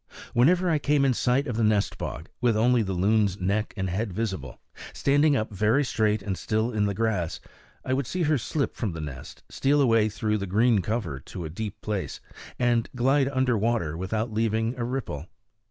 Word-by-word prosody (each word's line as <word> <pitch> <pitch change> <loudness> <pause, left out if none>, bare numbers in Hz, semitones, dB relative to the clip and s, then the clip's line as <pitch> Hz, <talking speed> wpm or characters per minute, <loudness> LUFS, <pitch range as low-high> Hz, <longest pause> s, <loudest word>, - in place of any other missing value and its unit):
Whenever 175 +9 +4
I 160 -3 +2
came 145 -1 +2
in 130 - +3
sight 125 +3 +1
of 125 -5 -3
the 115 - +1
nest 105 -2 +1
bog, 80 +7 -5
with 120 -3 +3
only 120 +2 +4
the 95 -3 -2
loon's 100 +1 +2
neck 100 +4 0
and 95 -1 -1
head 100 +4 -2
visible, 95 - -4 0.3
standing 145 +1 +3
up 110 -3 -2
very 110 +8 +2
straight 110 -5 0
and 95 -1 -2
still 110 +5 -1
in 105 -2 +1
the 100 - -2
grass, 100 -6 -1 0.5
I 130 - 0
would 135 -2 -1
see 180 -1 -1
her 150 -2 +2
slip 140 +4 -2
from 105 -7 -2
the 80 - -6
nest, 70 -5 -8
steal 145 +2 +2
away 115 -5 +4
through 105 0 -1
the 100 - -4
green 110 +3 +3
cover 95 - -2
to 85 +5 -8
a 80 - -6
deep 105 +3 -6
place, 105 -3 -3 0.4
and 120 -2 +1
glide 135 +2 +3
under 130 -3 +1
water 110 -8 0
without 110 +6 -2
leaving 115 +1 0
a 125 - -3
ripple. 115 - -4
110 Hz, 200 wpm, -26 LUFS, 100-125 Hz, 0.5 s, Whenever